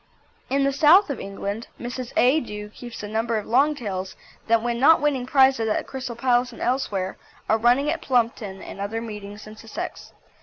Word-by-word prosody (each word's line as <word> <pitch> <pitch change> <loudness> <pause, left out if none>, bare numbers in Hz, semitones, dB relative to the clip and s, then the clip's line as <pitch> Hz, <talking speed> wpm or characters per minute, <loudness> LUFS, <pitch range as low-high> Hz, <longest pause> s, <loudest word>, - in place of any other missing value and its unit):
In 275 +1 +2
the 275 0 +1
South 315 +5 +6
of 265 - -4
England 200 +3 -5
Mrs. 245 0 -5
A. 260 +6 +5
Dewe 210 -5 -7
keeps 240 +1 -9
a - - -4
number 225 +2 -1
of 210 - -4
longtails 235 -8 0 0.3
that 230 0 +3
when 240 -1 -1
not 320 +5 +6
winning 275 -4 0
prizes 265 -4 +4
at - - +1
the - - -2
Crystal 260 -3 -6
Palace 245 +1 +1
and - - -12
elsewhere 205 -7 -1 0.3
are 220 - +2
running 250 +6 +3
at 330 - -3
Plumpton 230 -6 -1
and - - -9
other 215 +3 -3
meetings 210 -2 -8
in 215 0 -11
Sussex. 225 0 -7
235 Hz, 190 wpm, -24 LUFS, 215-265 Hz, 0.3 s, South